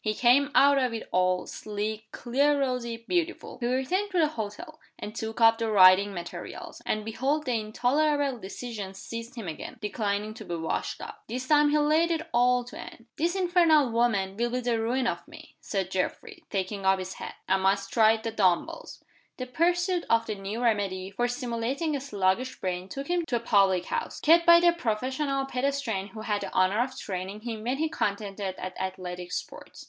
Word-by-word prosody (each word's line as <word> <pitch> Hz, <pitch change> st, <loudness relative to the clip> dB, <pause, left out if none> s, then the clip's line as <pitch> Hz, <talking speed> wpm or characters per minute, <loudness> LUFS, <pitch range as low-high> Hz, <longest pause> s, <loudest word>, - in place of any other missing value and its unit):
He 215 Hz, -1 st, 0 dB
came 255 Hz, +5 st, +4 dB
out 280 Hz, 0 st, +6 dB
of 250 Hz, -3 st, 0 dB
it 225 Hz, -, -6 dB
all, 185 Hz, 0 st, +2 dB
sleek, 215 Hz, +1 st, -5 dB
clear 280 Hz, +4 st, +1 dB
rosy, 235 Hz, -4 st, -2 dB
beautiful. 350 Hz, -1 st, -2 dB
He 240 Hz, -, -1 dB
returned 265 Hz, +12 st, 0 dB
to 370 Hz, -, -2 dB
the 315 Hz, -3 st, +4 dB
hotel, 225 Hz, +5 st, -7 dB, 0.2 s
and 210 Hz, -, -7 dB
took 225 Hz, 0 st, -5 dB
up 225 Hz, 0 st, +6 dB
the 225 Hz, -1 st, -1 dB
writing 195 Hz, 0 st, +7 dB
materials 175 Hz, -3 st, -8 dB
and 215 Hz, 0 st, -1 dB
behold 275 Hz, +7 st, -1 dB
the 255 Hz, -, -1 dB
intolerable 280 Hz, +6 st, +1 dB
indecision 205 Hz, -1 st, -7 dB
seized 230 Hz, +5 st, -7 dB
him 225 Hz, -6 st, -6 dB
again, 160 Hz, -, -7 dB
declining 210 Hz, 0 st, -2 dB
to 215 Hz, -, -10 dB
be 175 Hz, -4 st, -4 dB
washed 165 Hz, -1 st, -3 dB
out! -, -, -8 dB
This 255 Hz, +2 st, -4 dB
time 295 Hz, 0 st, +5 dB
he 300 Hz, -, +3 dB
laid 310 Hz, +3 st, +3 dB
it 325 Hz, 0 st, -2 dB
all 245 Hz, +1 st, +3 dB
to 245 Hz, -, -10 dB
Anne. 230 Hz, -, -10 dB
"That 340 Hz, +4 st, 0 dB
infernal 340 Hz, -7 st, +4 dB
woman 215 Hz, -5 st, +1 dB
will 240 Hz, +1 st, 0 dB
be 250 Hz, +1 st, -1 dB
the 240 Hz, -2 st, 0 dB
ruin 245 Hz, +3 st, 0 dB
of -, -, -2 dB
me," -, -, -14 dB
said 190 Hz, -3 st, -3 dB
Geoffrey, 340 Hz, -, -3 dB
taking 195 Hz, 0 st, -3 dB
up 190 Hz, 0 st, +4 dB
his 185 Hz, 0 st, -5 dB
hat. -, -, -8 dB
"I 190 Hz, -, +3 dB
must 195 Hz, +1 st, 0 dB
try 220 Hz, -1 st, +5 dB
the 225 Hz, +1 st, -4 dB
dumb 185 Hz, -5 st, +3 dB
bells." -, -, -10 dB, 0.3 s
The 255 Hz, -, -4 dB
pursuit 350 Hz, +6 st, +1 dB
of 230 Hz, 0 st, +3 dB
the 215 Hz, -, -3 dB
new 205 Hz, +4 st, -5 dB
remedy 195 Hz, -4 st, 0 dB
for 240 Hz, +5 st, 0 dB
stimulating 245 Hz, +5 st, -2 dB
a 275 Hz, -, -3 dB
sluggish 215 Hz, 0 st, -1 dB
brain 180 Hz, 0 st, -3 dB
took 275 Hz, +7 st, -6 dB
him 350 Hz, 0 st, +1 dB
to 245 Hz, -, -1 dB
a -, -, +1 dB
public 195 Hz, -5 st, +3 dB
house, 470 Hz, -, -3 dB
kept 335 Hz, +2 st, +5 dB
by 340 Hz, 0 st, +9 dB
the 345 Hz, 0 st, +5 dB
professional 270 Hz, +1 st, -1 dB
pedestrian 255 Hz, -6 st, -2 dB
who 215 Hz, +2 st, -9 dB
had 210 Hz, -2 st, -1 dB
the -, -, -5 dB
honor 185 Hz, +5 st, +3 dB
of 255 Hz, +1 st, -3 dB
training 190 Hz, +2 st, -5 dB
him 225 Hz, -2 st, -5 dB
when 250 Hz, +4 st, -1 dB
he 320 Hz, +2 st, +1 dB
contended 200 Hz, -6 st, -3 dB
at 185 Hz, 0 st, -6 dB
Athletic 180 Hz, -1 st, -5 dB
Sports. -, -, -7 dB
230 Hz, 195 wpm, -27 LUFS, 200-280 Hz, 0.3 s, by